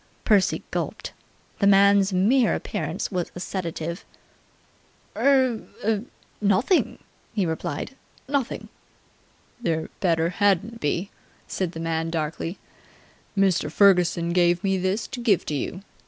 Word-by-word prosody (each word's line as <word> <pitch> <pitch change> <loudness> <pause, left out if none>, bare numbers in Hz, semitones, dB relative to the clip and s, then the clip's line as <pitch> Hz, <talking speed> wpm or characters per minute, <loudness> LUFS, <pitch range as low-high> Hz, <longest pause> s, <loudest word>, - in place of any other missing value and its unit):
Percy 205 -4 +3
gulped. - - -4 0.5
The 200 - +3
man's 200 0 +5
mere 220 +8 +3
appearance - - -3
was 180 -3 -2
a - - -6
sedative. 170 -1 -4 1.1
"Er 260 -4 +3 0.8
nothing!" 210 - +2 0.4
he 200 -4 +1
replied. 160 - -4 0.3
"Nothing!" 275 -2 -2 0.9
"There 160 -7 -1
better 165 -3 +2
hadn't 205 +4 +1
be!" 170 +5 -1 0.4
said 180 -3 -2
the 165 - -6
man 165 0 -1
darkly. 165 +2 -3 0.8
"Mr. 190 -6 +2
Ferguson 175 -2 +4
give 175 0 +3
me 195 -1 +2
this 190 +4 -1
to 265 - -7
give 225 -6 +2
to - - -3
you. 175 +7 -4
185 Hz, 115 wpm, -24 LUFS, 170-205 Hz, 1.1 s, man's